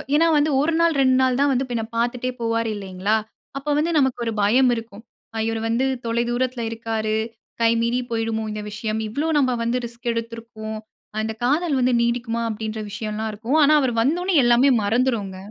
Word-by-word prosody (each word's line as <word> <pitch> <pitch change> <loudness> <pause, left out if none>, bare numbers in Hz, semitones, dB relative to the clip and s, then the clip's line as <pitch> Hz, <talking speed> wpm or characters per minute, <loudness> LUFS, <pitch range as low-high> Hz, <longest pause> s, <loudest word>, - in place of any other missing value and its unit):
ஏனா, 330 +2 +4
வந்து 295 +1 +2
1 325 +2 +1
நாள், 335 -1 +4
2 260 -1 +4
நாள் 255 -1 +2
தான் 285 0 +3
வந்து 260 +1 +1
பின்ன 230 -2 -1
பார்த்துட்டே 245 +2 0
போவார் 230 0 0
இல்லைங்களா? 195 +1 -1 0.4
அப்ப 290 +1 -1
வந்து 325 +3 +1
நமக்கு 265 -3 +2
ஒரு 230 - -1
பயம் 245 +5 +4
இருக்கும். 225 -1 -8 0.4
இவர் 225 -1 -2
வந்து 235 +4 +1 0.2
தொலை 235 +1 +1
தூரத்தில 250 0 -1
இருக்காரு. 225 -1 -2 0.5
கை 230 0 +5
மீறி 235 +2 +1
போய்டுமோ 225 -1 -1
இந்த 210 0 -4
விஷயம். 215 0 -3
இவ்வளோ 285 +9 -2
நம்ம 255 -3 +2
வந்து 235 +2 0
ரிஸ்க் 235 +1 -6
எடுத்திருக்கோம். 230 -1 -6 0.4
அந்த 220 0 -2
காதல் 295 +2 +1
வந்து 250 0 +2
நீடிக்குமா 235 -1 -1
அப்படீன்ற 220 0 -4
விஷயம்லாம் 215 0 -3
இருக்கும். 230 +9 -1
ஆனா, 305 +2 +6
அவர் 250 -3 0
வந்தோனே 350 +8 +1
எல்லாமே 240 +3 +5
மறந்துருங்க. 215 -3 0
235 Hz, 175 wpm, -22 LUFS, 220-260 Hz, 0.5 s, ஆனா